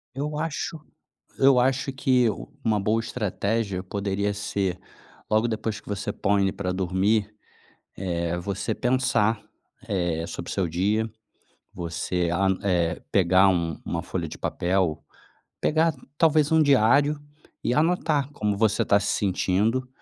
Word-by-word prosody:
Eu 150 +2 -3
acho 160 0 -3 0.6
eu 135 -1 +6
acho 135 +2 +1
que 130 -2 +2 0.4
uma 110 -2 +2
boa 110 +3 +1
estratégia 105 -3 -2
poderia 100 +1 -2
ser, 100 -3 -2 0.5
logo 110 +2 +3
depois 110 -1 -3
que - - -16
você 100 -1 -3
põe 100 0 +1
ele 95 -1 +1
pra 95 -2 -3
dormir, 95 +3 +1 0.6
eh, 85 -2 -2
você 100 +4 -3
pensar, 120 -4 +1 0.5
eh, 85 -5 -1
sobre - - -6
o - - -3
seu 90 -3 0
dia. 105 +7 0 0.6
Você, 85 +1 -2
an 95 +2 +1
eh, 90 -4 +1
pegar 95 0 +5
um 85 -4 0
uma - - -3
folha - - -4
de - - -9
papel. 90 -3 0 0.6
Pegar 160 +1 +2 0.2
talvez 155 -2 +4
um 160 -1 +6
diário 140 +2 +4 0.5
e 120 - +1
anotar 150 -3 +1
como 105 -7 -1
você 110 0 +2
tá 100 - +4
se 100 - -2
sentindo. 105 +6 +1
105 Hz, 140 wpm, -25 LUFS, 95-125 Hz, 0.6 s, eu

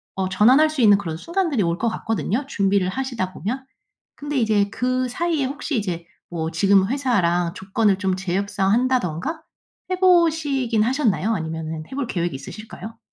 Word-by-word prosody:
어 190 -1 -1
전환할 250 +11 +5
수 310 -2 -6
있는 205 -4 +6
그런 165 -5 -5
순간들이 335 - 0
올 170 0 0
것 230 - 0
같거든요 225 +3 -2
준비를 195 -6 +1
하시다 230 -4 -3
보면. 245 - -4 0.5
근데 290 -1 -4
이제 215 -4 +2
그 255 +3 -1
사이에 315 +2 -1
혹시 285 +1 -3
이제 175 -5 -3 0.2
뭐 165 -2 -3
지금 195 +3 +3
회사랑 180 -11 +1
조건을 195 0 0
좀 190 -2 0
재협상한다든가 200 - 0 0.5
해 370 - 0
보시긴 310 - +3
하셨나요? 230 -4 +1
아니면은 160 -3 -4
해 - - -8
볼 280 -1 -1
계획이 175 - -2
있으실까요? 220 +9 -9
215 Hz, 355 characters per minute, -22 LUFS, 185-265 Hz, 0.5 s, 있는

